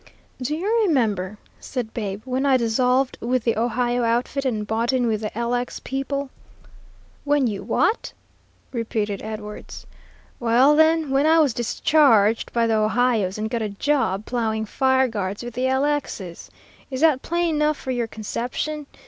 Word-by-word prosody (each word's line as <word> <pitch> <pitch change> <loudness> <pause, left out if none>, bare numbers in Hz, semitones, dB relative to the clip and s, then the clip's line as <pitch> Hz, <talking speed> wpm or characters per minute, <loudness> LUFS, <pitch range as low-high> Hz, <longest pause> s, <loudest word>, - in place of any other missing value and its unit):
"Do 290 +5 -1
you 425 +8 +1
remember," 210 - 0 0.2
said 240 -4 -5
Babe, 205 -2 -4
"when 260 +1 -1
I 275 -2 +4
dissolved 250 +3 +1
with 245 +1 0
the 230 - +1
'Ohio' 240 +2 0
outfit 240 +4 0
and 220 -5 -1
bought 225 +3 0
in 255 -2 +1
with 220 -2 0
the 215 - -2
'LX' 245 +1 -2
people?" 275 +1 -3 0.9
"When 290 -2 +2
you 210 -4 -2
what?" 450 - 0 0.6
repeated 220 -4 -2
Edwards. 215 -1 -8 0.5
"Well, 245 +5 +4
then, 315 -1 +3
when 275 +3 +3
I 325 +1 +5
was 295 -7 +4
discharged 235 -3 +3
by 235 -1 +1
the 225 -1 +2
'Ohio's' 215 -3 +1
and 215 +1 -2
got 230 +1 -2
a 215 - -2
job 210 -3 0
ploughing 220 -3 -1
fire 260 +3 +2
guards 205 -2 -4
with 240 -1 -7
the 250 +2 -1
'LX's.' 265 -10 -2 0.4
Is 260 0 -4
that 310 -5 +4
plain 340 -1 0
enough 300 0 +1
for 260 - -5
your 240 -2 -1
conception? 250 +7 -4
245 Hz, 155 wpm, -23 LUFS, 220-275 Hz, 0.9 s, I